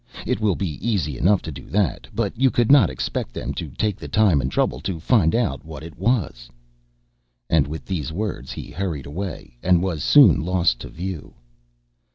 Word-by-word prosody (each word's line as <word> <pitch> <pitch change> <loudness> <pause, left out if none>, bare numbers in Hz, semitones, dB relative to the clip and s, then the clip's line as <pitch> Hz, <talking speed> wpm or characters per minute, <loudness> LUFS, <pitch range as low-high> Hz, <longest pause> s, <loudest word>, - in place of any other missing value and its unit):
It - - -1
will 105 -4 +2
be 85 -7 -4
easy 95 - -1
enough 95 +9 +2
to 80 - -5
do 65 -3 -10
that, 100 -4 0
but 110 -2 -1
you 130 +3 +3
could 120 0 +2
not 145 -1 +7
expect - - -4
them - - -4
to - - -5
take 105 -3 -2
the - - -8
time 100 -10 +3
and 65 +1 -2
trouble - - 0
to 95 -4 -4
find 85 -1 +3
out 100 - 0
what 80 -2 -9
it 80 0 -10
was." 95 - -1 1.0
And, 80 -4 +4
with 80 +2 -7
these 80 -5 -3
words, 90 - -4
he - - -7
hurried 85 -7 -3
away, 80 -6 -7
and 90 -1 +3
was 85 -6 -2
soon 145 - +6
lost 85 -7 +1
to - - -8
view. 90 -2 -6
90 Hz, 195 wpm, -22 LUFS, 75-105 Hz, 1.0 s, not